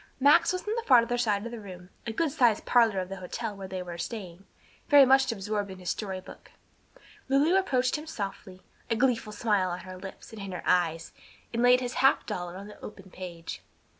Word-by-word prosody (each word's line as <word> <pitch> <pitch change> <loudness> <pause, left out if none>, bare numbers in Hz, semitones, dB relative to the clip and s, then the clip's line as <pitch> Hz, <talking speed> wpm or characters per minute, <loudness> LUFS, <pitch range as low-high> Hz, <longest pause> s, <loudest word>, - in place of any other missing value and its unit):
Max 285 +2 +5
was 365 +2 -4
on 425 - 0
the - - 0
farther 245 -2 +5
side 215 -4 0
of 235 - -5
the 235 - -6
room 180 -3 -11 0.2
a - - -1
good 310 +6 0
sized 245 -7 +2
parlor 230 -5 +4
of 185 - -6
the 195 - -6
hotel 205 +4 -5
where 195 -1 -7
they 185 -1 -5
were 175 -1 -8
staying 195 -4 -6 0.4
very 285 -2 +8
much 265 0 +4
absorbed 205 -1 -3
in 190 -1 -9
a 180 - -13
story 190 0 -3
book; 185 - -13 0.8
Lulu 290 +7 +4
approached 260 -9 +2
him 310 - -10
softly, 195 -7 -6 0.3
a 230 - +1
gleeful 245 -3 +1
smile 205 -3 +1
on 175 +1 -4
her 185 +1 -9
lips 195 +4 -10
and 215 - -8
in 195 -1 -6
her 180 - -6
eyes, 165 -2 +1 0.4
and 230 - 0
laid 250 +1 +5
his 250 0 -3
half 270 +1 +4
dollar 175 0 -5
on 200 - -8
the 210 - -13
open 195 -3 -10
page. 175 -3 -8
210 Hz, 215 wpm, -28 LUFS, 185-250 Hz, 0.8 s, very